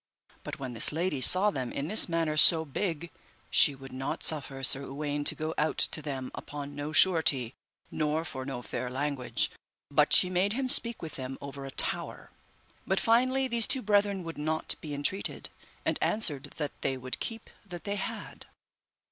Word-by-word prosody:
But - - -7
when 130 -2 -7
this 115 - +1
lady 160 -3 -2
saw 190 +9 +8
them 130 -7 -5
in 140 - -4
this 210 0 +5
manner 165 -2 -1
so 160 +1 +7
big, 170 +2 -4 0.4
she 145 - +4
would 135 0 -12
not 135 +1 -5
suffer 135 -3 +2
Sir 135 +1 +3
Uwaine 145 +1 -4
to - - +5
go 155 0 -4
out 155 +1 -1
to 155 - +1
them 135 -3 -6
upon 145 -1 -8
no 145 +1 -5
surety 155 -7 +3 0.4
nor 155 +2 -2
for 130 -4 -7
no 130 -2 -6
fair 125 - -5
language, 135 -1 -2 0.4
but 150 +1 +2
she 185 - +7
made 185 +3 0
him 260 +1 -3
speak 235 -4 +5
with 160 - -6
them 130 0 -7
over 140 0 -8
a - - -7
tower, - - -1 0.6
but 190 - +1
finally 255 +3 +2
these 235 -2 +1
two 265 -2 +1
brethren 205 -2 +1
would 165 -2 -8
not 155 +1 -2
be 150 -2 -6
entreated, 145 +7 -3 0.3
and - - -1
answered 155 -10 -1
that 150 -2 -3
they 135 - -2
would 130 0 -3
keep 225 -1 -7
that 175 -4 -10
they 200 0 -4
had. 190 - -7
155 Hz, 180 wpm, -28 LUFS, 135-185 Hz, 0.6 s, saw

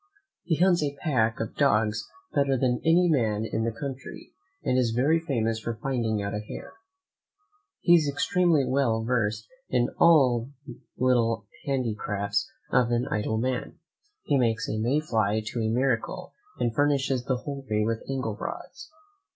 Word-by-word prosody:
He 170 -2 0
hunts 175 +1 +3
a 145 -1 -1
pack 115 -8 +1
of 115 - -4
dogs 105 -6 +1 0.2
better 140 -2 +2
than 125 -1 +1
any 170 +2 +4
man 110 -9 +1
in 110 0 -2
the 115 - 0
country, 135 +3 -8 0.3
and 125 - +1
is 120 -3 +1
very 145 +7 +3
famous 115 -8 -1
for 115 0 -4
finding 115 -3 -1
out 100 +1 -3
a 105 - -2
hare. 105 - -9 1.1
He 175 - +5
is 160 -4 +5
extremely 175 -4 +2
well 125 -4 +1
versed 110 -2 -1 0.2
in 120 -1 +2
all 130 -8 +5 0.2
the 120 - -10 0.2
little 115 -4 +2 0.2
handicrafts 105 - -1 0.2
of 120 -2 +3
an 120 0 0
idle 110 +1 0
man: 125 +2 -2 0.5
he 140 - +2
makes 115 -3 +1
a 110 - -2
Mayfly 110 -5 +1
to 120 - -4
a 110 - 0
miracle; 120 0 -1 0.2
and 120 - 0
furnishes 135 -2 +1
the 130 -2 0
whole 140 +1 -6
country 105 -5 -1
with 115 0 -1
angle 130 -6 -2
rods. 280 - -7
125 Hz, 160 wpm, -27 LUFS, 110-140 Hz, 1.1 s, He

